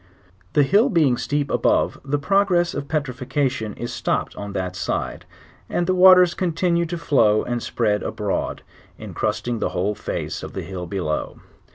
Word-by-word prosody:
The 145 - +5
hill 205 - +4
being 155 - +3
steep 145 +2 -2
above - - +1
the 145 +2 -1
progress 175 +2 +2
of 140 0 -4
petrifaction 130 -5 -2
is 120 +1 -5
stopped 120 -1 -2
on 100 0 -6
that 90 -1 -3
side, - - -3 0.4
and 175 - 0
the 185 - +1
waters 185 -1 +7
continue 170 -1 0
to 175 +1 -4
flow 110 -10 +3
and 120 -1 -3
spread 105 -3 0
abroad, 105 -2 -3 0.3
incrusting 120 -2 -3
the - - 0
whole 95 +3 -1
face 105 - -4
of - - -8
the - - -4
hill 90 -2 -6
below. 85 -5 -3
135 Hz, 160 wpm, -22 LUFS, 105-170 Hz, 0.4 s, waters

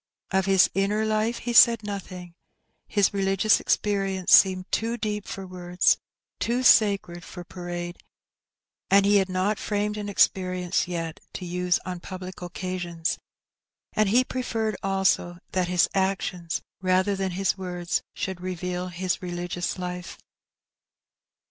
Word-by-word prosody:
Of 190 0 +1
his 195 -1 +6
inner 205 +3 +1
life 220 +2 0
he 240 - -4
said 230 -1 +7
nothing. 185 -4 -7 0.5
His 205 -2 +2
religious 195 +2 +3
experience 195 -3 0
seemed 185 -1 +5
too 230 +1 0
deep 210 -2 -3
for 195 -1 -6
words, 180 -1 +1 0.4
too 245 +2 0
sacred 200 -7 +4
for 180 -1 -9
parade, 175 -1 -6 0.9
and 200 0 +5
he 205 0 +5
had 190 -1 +1
not 185 +3 0
framed 210 0 -1
an 205 -1 -4
experience 185 -3 +1
yet 165 -2 -4
to 180 - -6
use 180 0 +1
on 180 -1 -4
public 185 0 -8
occasions, 175 -1 -3 0.7
and 215 -2 +2
he 245 +5 +4
preferred 225 -5 -2
also 190 -2 +1
that 185 -1 0
his 180 -1 +3
actions, 190 -3 -1 0.2
rather 185 +2 +2
than 190 -1 -2
his 190 0 0
words, 180 -2 -2
should 190 -2 -4
reveal 180 0 -3
his 180 +1 -2
religious 175 0 -3
life. 180 0 -6
185 Hz, 135 wpm, -25 LUFS, 180-205 Hz, 0.9 s, said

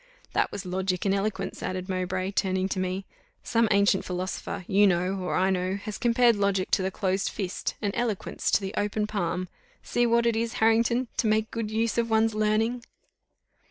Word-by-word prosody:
"That - - +1
was 200 - -6
logic 185 0 -1
and 195 - +3
eloquence," 195 -1 -2
added 185 0 -3
Mowbray, 185 0 -2
turning 190 -1 0
to 190 - -2
me. 185 +1 -2 0.4
"Some 230 -1 +2
ancient 200 -1 +3
philosopher, 180 0 -4
you 205 +1 +5
know, 180 0 +1
or 180 - -2
I 190 +1 +2
know, 185 0 0
has 205 +1 -6
compared 240 -1 +4
logic 200 -2 0
to - - +3
the 190 - 0
closed 190 0 -1
fist, 190 -3 -3
and 200 -1 0
eloquence 230 -5 -2
to - - +3
the 195 +1 -4
open 210 +1 0
palm. 185 -3 -2 0.4
See 240 0 +1
what 235 0 +3
it 235 -1 +2
is, 230 +1 -1
Harrington, 230 +3 +2
to 225 - +2
make 215 0 +1
good 230 -2 -3
use 225 +1 0
of 230 0 0
one's 220 0 +3
learning." 215 +3 +1
200 Hz, 190 wpm, -27 LUFS, 185-225 Hz, 0.4 s, you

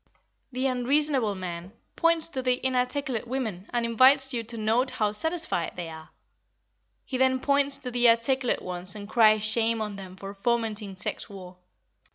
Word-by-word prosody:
The 255 +1 -2
unreasonable 260 -3 +1
man 180 0 -7 0.2
points 335 -1 +2
to 265 -5 -3
the 250 -1 +1
inarticulate 255 -1 -1
women 220 -7 -4
and 240 -1 0
invites 265 +4 +5
you 235 - -1
to 230 +1 +2
note 225 +4 +1
how 210 -4 -1
satisfied 320 - -1
they 175 -2 -5
are; 160 0 -11 1.0
he 255 - -4
then 260 0 +3
points 280 0 +2
to 255 -3 -7
the 245 0 +4
articulate 245 +2 +1
ones 180 +1 -3
and 205 -1 -8
cries 215 -1 +4
shame 225 +1 +1
on 210 -2 -4
them 185 -2 -9
for 195 +1 -8
fomenting 215 -2 -2
sex 185 - -4
war. 185 -2 -11
235 Hz, 165 wpm, -26 LUFS, 205-260 Hz, 1.0 s, invites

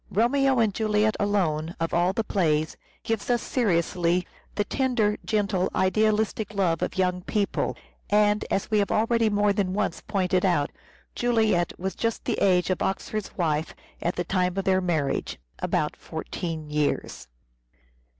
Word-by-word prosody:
" - - -34
Romeo 265 +5 +2
and 220 -4 +2
Juliet 215 0 +1
" - - -30
alone, 175 -5 0
of 165 0 -2
all 175 +2 +3
the 225 +3 -1
plays, 155 -7 0 0.3
gives 225 0 -2
us 240 -2 +2
seriously 175 -5 +1 0.3
the 205 - +1
tender, 230 -3 +1
gentle, 200 -4 0
idealistic 215 +2 +1
love 175 -5 +1
of - - -2
young 180 -1 +1
people. 205 +2 -1 0.3
And, 210 0 +3
as 195 - -1
we 215 - +4
have 200 - +1
already 230 0 +2
more 205 0 +2
than 195 -2 -1
once 210 -1 -1
pointed 185 -1 0
out, 175 -7 +2 0.4
Juliet 220 -8 +1
was 190 +1 -3
just 230 -1 -2
the - - -1
age 185 -1 +3
of 185 - -1
Oxford's 210 +2 -3
wife 160 -3 -1 0.3
at 175 - -1
the 175 - -1
time 180 +1 0
of 195 - 0
their 190 -1 +3
marriage 160 -6 -1 0.2
(about - - -1
14 155 - -5
years). 150 -1 -1
195 Hz, 160 wpm, -26 LUFS, 175-215 Hz, 0.4 s, we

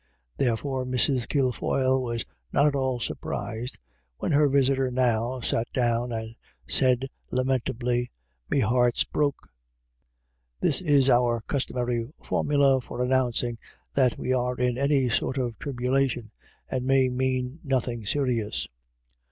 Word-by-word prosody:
There 120 -4 +2
fore 135 0 -3
Mrs. 125 0 +1
Kilfoyle 130 -1 +1
was 120 -2 -3 0.3
not 140 - +3
at 150 - +3
all 130 -2 0
surprised 115 0 -4 0.4
when - - -2
her 145 0 +4
visitor 135 -1 +2
now 125 0 0
sat 115 +1 0
down 120 -1 +1
and 110 0 -5 0.3
said 130 0 +3 0.2
lamentably: 125 -1 0 0.2
" - - -44
Me 140 - +2
heart's 120 +1 +3
broke." 145 -2 -1 1.1
This 140 - +2
is 145 -6 +4
our 120 -2 +3
customary 125 -3 -2
formula 140 -2 +2
for 125 - -4
announcing 125 -2 +1 0.3
that 130 -3 +2
we 130 - -1
are 125 0 0
in 125 -1 +1
any 140 0 +2
sort 130 +3 0
of 120 -3 -2
tribulation, 125 -3 -1 0.4
and 130 -1 -2
may 135 0 +3
mean 130 +2 -1
nothing 125 -5 -1
serious. 120 -5 0
125 Hz, 130 wpm, -26 LUFS, 120-135 Hz, 1.1 s, her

